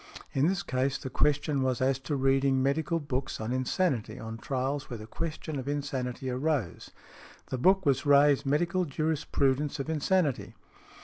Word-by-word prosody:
In 135 Hz, +3 st, +3 dB
this 190 Hz, 0 st, 0 dB
case 130 Hz, +2 st, 0 dB
the 130 Hz, -, -7 dB
question 145 Hz, -1 st, +1 dB
was 130 Hz, -2 st, 0 dB
as 130 Hz, 0 st, +1 dB
to 145 Hz, +2 st, -3 dB
reading 135 Hz, 0 st, +2 dB
medical 155 Hz, +4 st, +1 dB
books 135 Hz, -3 st, -3 dB
on 110 Hz, +3 st, -2 dB
insanity 130 Hz, -, 0 dB
on 110 Hz, 0 st, -7 dB
trials 135 Hz, +2 st, -2 dB
where 120 Hz, -, -5 dB
the 110 Hz, -, -9 dB
question 155 Hz, +3 st, -4 dB
of 130 Hz, -, -7 dB
insanity 135 Hz, -3 st, -3 dB
arose; 130 Hz, -, -2 dB, 0.6 s
the 130 Hz, -, -2 dB
book 190 Hz, +6 st, +4 dB
was 140 Hz, -1 st, +2 dB
Ray's 145 Hz, -1 st, +5 dB
"Medical 170 Hz, +6 st, +1 dB
Jurisprudence 145 Hz, -2 st, 0 dB
of 140 Hz, +4 st, -2 dB
Insanity." 160 Hz, -2 st, 0 dB
140 Hz, 160 wpm, -29 LUFS, 130-150 Hz, 0.6 s, Ray's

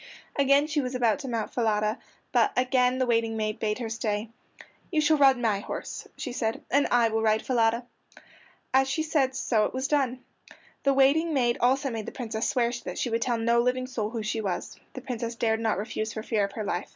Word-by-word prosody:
Again 280 Hz, +1 st, +4 dB
she 300 Hz, -1 st, 0 dB
was 255 Hz, -1 st, -4 dB
about 235 Hz, -2 st, +2 dB
to 280 Hz, -, -6 dB
mount 230 Hz, -3 st, -3 dB
Falada, 215 Hz, -1 st, 0 dB, 0.3 s
but 410 Hz, -, +3 dB
again 250 Hz, 0 st, +2 dB
the 260 Hz, -, +1 dB
waiting 230 Hz, -2 st, +1 dB
maid 215 Hz, -1 st, -2 dB
bade 210 Hz, -1 st, -1 dB
her 240 Hz, -2 st, -4 dB
stay; 220 Hz, -1 st, -2 dB, 0.6 s
"You 315 Hz, -, +2 dB
shall 305 Hz, 0 st, +3 dB
ride 270 Hz, -2 st, +6 dB
my 220 Hz, -5 st, +1 dB
horse," -, -, -6 dB
said 240 Hz, -5 st, -2 dB
she, -, -, -12 dB
"and 280 Hz, +2 st, +3 dB
I 235 Hz, -2 st, +4 dB
will 220 Hz, 0 st, 0 dB
ride 220 Hz, 0 st, +2 dB
Falada." 235 Hz, -1 st, +1 dB, 0.9 s
As 265 Hz, 0 st, +4 dB
she 315 Hz, +3 st, 0 dB
said 275 Hz, -5 st, +1 dB
so 225 Hz, -4 st, +1 dB
it -, -, -4 dB
was 260 Hz, +1 st, -1 dB
done. 265 Hz, -4 st, 0 dB, 0.6 s
The 275 Hz, -, +3 dB
waiting 300 Hz, +4 st, +3 dB
maid 240 Hz, -3 st, +2 dB
also 265 Hz, +2 st, +2 dB
made 220 Hz, -2 st, -5 dB
the -, -, -4 dB
Princess 225 Hz, -2 st, -3 dB
swear 240 Hz, -2 st, +1 dB
that -, -, -6 dB
she 245 Hz, -, -1 dB
would 230 Hz, +1 st, 0 dB
tell 240 Hz, 0 st, 0 dB
no 235 Hz, +1 st, +3 dB
living 250 Hz, +1 st, 0 dB
soul 230 Hz, -5 st, -3 dB
who 225 Hz, -1 st, -4 dB
she 220 Hz, +1 st, -2 dB
was. 190 Hz, -4 st, -4 dB
The 260 Hz, -, -7 dB
Princess 235 Hz, -2 st, -4 dB
dared 225 Hz, -1 st, +1 dB
not 225 Hz, -1 st, 0 dB
refuse 215 Hz, +1 st, -3 dB
for 220 Hz, -, -5 dB
fear 215 Hz, -3 st, +1 dB
of 200 Hz, -, -8 dB
her 215 Hz, -, -4 dB
life. 195 Hz, -2 st, -3 dB
240 Hz, 220 wpm, -27 LUFS, 220-265 Hz, 0.9 s, ride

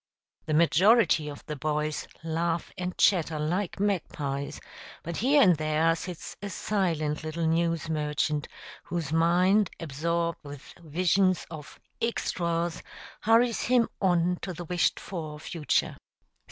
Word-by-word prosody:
The 155 Hz, -, +1 dB
majority 170 Hz, 0 st, +4 dB
of 145 Hz, -, -10 dB
the 150 Hz, -, -5 dB
boys 150 Hz, +1 st, -2 dB, 0.2 s
laugh 165 Hz, +1 st, -1 dB
and 180 Hz, 0 st, -4 dB
chatter 165 Hz, -5 st, +3 dB
like 175 Hz, +6 st, -2 dB
magpies, 150 Hz, -8 st, -2 dB, 0.4 s
but 170 Hz, 0 st, -5 dB
here 275 Hz, +4 st, +5 dB
and 180 Hz, -5 st, +6 dB
there 155 Hz, +2 st, +2 dB
sits 175 Hz, 0 st, -7 dB
a 205 Hz, -, -4 dB
silent 165 Hz, -7 st, -1 dB
little 160 Hz, +1 st, -3 dB
news 165 Hz, 0 st, +1 dB
merchant, 150 Hz, -1 st, -1 dB, 0.4 s
whose 165 Hz, -4 st, -3 dB
mind, 180 Hz, +5 st, +3 dB
absorbed 170 Hz, +2 st, -2 dB
with 145 Hz, -1 st, -10 dB
visions 180 Hz, +3 st, +1 dB
of 155 Hz, -2 st, -10 dB, 0.2 s
"extras," 170 Hz, -7 st, -1 dB, 0.4 s
hurries 230 Hz, +1 st, +3 dB
him 245 Hz, -2 st, +3 dB
on 180 Hz, -2 st, +2 dB
to 185 Hz, -, -4 dB
the 175 Hz, +1 st, -7 dB
wished 175 Hz, +1 st, +1 dB
for 155 Hz, -5 st, -6 dB
future. 155 Hz, -1 st, -1 dB
170 Hz, 125 wpm, -28 LUFS, 155-185 Hz, 0.4 s, and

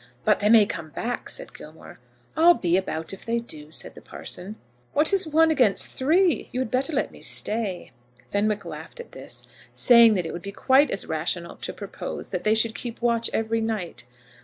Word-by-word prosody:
"But 210 Hz, -, +3 dB
they 210 Hz, -, +2 dB
may 220 Hz, -2 st, +7 dB
come 160 Hz, -5 st, -6 dB
back," 235 Hz, -, -4 dB
said -, -, -5 dB
Gilmore. -, -, -13 dB, 0.4 s
"I'll 340 Hz, +2 st, +6 dB
be 175 Hz, -, +1 dB
about 165 Hz, -3 st, -2 dB
if 195 Hz, -, -10 dB
they 230 Hz, 0 st, -1 dB
do," 155 Hz, -10 st, -8 dB
said -, -, -2 dB
the -, -, -13 dB
parson. 195 Hz, +4 st, -5 dB, 0.4 s
"What 305 Hz, +6 st, +3 dB
is 385 Hz, -3 st, +4 dB
one 320 Hz, +1 st, +4 dB
against 245 Hz, -10 st, +3 dB
three? 330 Hz, +5 st, +2 dB
You 250 Hz, -, -3 dB
had 240 Hz, -, -4 dB
better 265 Hz, +4 st, 0 dB
let -, -, -1 dB
me -, -, -15 dB
stay." 210 Hz, -5 st, 0 dB, 0.4 s
Fenwick 205 Hz, 0 st, -1 dB
laughed -, -, -9 dB
at 475 Hz, -, -10 dB
this, -, -, -8 dB, 0.3 s
saying 235 Hz, -3 st, +6 dB
that 180 Hz, -3 st, -1 dB
it -, -, -5 dB
would 170 Hz, -, -6 dB
be 200 Hz, -, -7 dB
quite 265 Hz, +7 st, +3 dB
as 195 Hz, -, -2 dB
rational 170 Hz, +2 st, -2 dB
to -, -, -4 dB
propose -, -, -7 dB
that -, -, -4 dB
they 215 Hz, +1 st, +3 dB
should 225 Hz, 0 st, +1 dB
keep 230 Hz, +2 st, -7 dB
watch 235 Hz, -1 st, +1 dB
every 225 Hz, 0 st, -1 dB
night. 215 Hz, -, -4 dB
225 Hz, 200 wpm, -24 LUFS, 195-260 Hz, 0.4 s, may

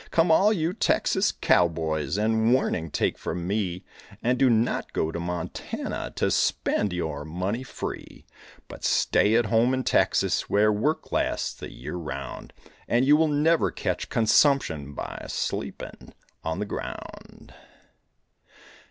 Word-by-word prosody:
Come 165 Hz, 0 st, +3 dB
all 195 Hz, +6 st, +5 dB
you 170 Hz, -4 st, 0 dB
Texas 195 Hz, -1 st, +1 dB
cowboys 80 Hz, -2 st, +1 dB
And 110 Hz, +2 st, +2 dB
warning 85 Hz, -10 st, -1 dB
take -, -, -1 dB
from 85 Hz, -1 st, -4 dB
me, 95 Hz, -2 st, -2 dB, 0.4 s
And 125 Hz, +1 st, +1 dB
do 135 Hz, -, +5 dB
not 115 Hz, 0 st, 0 dB
go 80 Hz, -, 0 dB
to 85 Hz, -, -4 dB
Montana 85 Hz, 0 st, -4 dB
To -, -, +1 dB
spend 105 Hz, -, +1 dB
your 80 Hz, -4 st, -3 dB
money 90 Hz, +9 st, -3 dB
free. 130 Hz, -, -7 dB, 0.4 s
But -, -, -11 dB
stay 105 Hz, +2 st, +3 dB
at 120 Hz, 0 st, +3 dB
home 115 Hz, +4 st, +3 dB
in 130 Hz, -, -2 dB
Texas -, -, +1 dB
Where 105 Hz, +1 st, +3 dB
work 145 Hz, +10 st, -1 dB
lasts -, -, -1 dB
the -, -, -9 dB
year -, -, -7 dB
around, 70 Hz, -5 st, -6 dB, 0.4 s
And 120 Hz, +2 st, +2 dB
you 145 Hz, +2 st, +6 dB
will 160 Hz, +1 st, +3 dB
never 155 Hz, +3 st, +2 dB
catch -, -, -3 dB
consumption 110 Hz, -, +2 dB
By -, -, -6 dB
sleeping -, -, -5 dB, 0.3 s
on 80 Hz, +1 st, -2 dB
the 105 Hz, -, -2 dB
ground. 105 Hz, -, -8 dB
105 Hz, 140 wpm, -26 LUFS, 85-130 Hz, 0.4 s, you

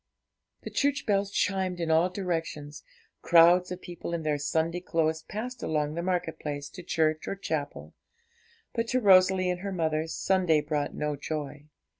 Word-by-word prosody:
The -, -, -6 dB
church 285 Hz, 0 st, 0 dB
bells 200 Hz, -2 st, +1 dB
chimed 190 Hz, -2 st, -1 dB
in 165 Hz, -1 st, -1 dB
all 165 Hz, +3 st, +4 dB
directions, 165 Hz, -6 st, -4 dB, 0.4 s
crowds 175 Hz, +2 st, +5 dB
of 180 Hz, 0 st, -5 dB
people 170 Hz, -1 st, -5 dB
in 165 Hz, -, -4 dB
their 150 Hz, -1 st, 0 dB
Sunday 160 Hz, +4 st, 0 dB
clothes 160 Hz, -2 st, 0 dB
passed 230 Hz, +7 st, -6 dB
along 150 Hz, -1 st, -1 dB
the 170 Hz, -, -3 dB
market 180 Hz, -2 st, -2 dB
place 145 Hz, -1 st, -5 dB
to 180 Hz, -, -10 dB
church 155 Hz, -2 st, 0 dB
or -, -, -2 dB
chapel; 145 Hz, -, -4 dB, 0.8 s
but 230 Hz, 0 st, -1 dB
to 255 Hz, -, +1 dB
Rosalie 185 Hz, -3 st, +5 dB
and 180 Hz, -, -3 dB
her 200 Hz, +2 st, -4 dB
mother 160 Hz, -3 st, -1 dB
Sunday 180 Hz, -2 st, +2 dB
brought 150 Hz, -1 st, -2 dB
no 150 Hz, -1 st, -2 dB
joy. 150 Hz, 0 st, -5 dB
170 Hz, 165 wpm, -28 LUFS, 155-185 Hz, 0.8 s, crowds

